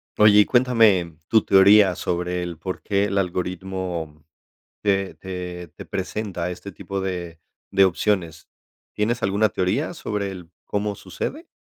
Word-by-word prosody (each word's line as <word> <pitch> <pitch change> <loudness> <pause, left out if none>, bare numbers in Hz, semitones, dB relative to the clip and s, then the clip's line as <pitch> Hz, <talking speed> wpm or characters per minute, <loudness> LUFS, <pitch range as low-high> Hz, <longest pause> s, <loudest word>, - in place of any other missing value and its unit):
Oye, 105 0 +6
y 105 - +7
cuéntame 110 - +3
tu 110 -2 +4
teoría 95 -1 +6
sobre 90 +1 -2
el 85 -2 -5
por 95 +3 -5
qué 100 0 +1
el 100 -1 -2
algoritmo 90 -4 -4 0.6
te 100 -2 0
te 90 -2 -7
te - - -9
presenta 95 -2 -3
este 90 +2 -7
tipo 100 +2 -5
de 90 -3 -5 0.3
de 95 0 +6
opciones. 90 -3 -1 0.4
¿Tienes 115 +3 -1
alguna 100 +3 +2
teoría 100 - -1
sobre 105 - -3
el 90 -3 -10 0.2
cómo 105 0 -2
sucede? 310 - -6
95 Hz, 140 wpm, -23 LUFS, 90-105 Hz, 0.6 s, y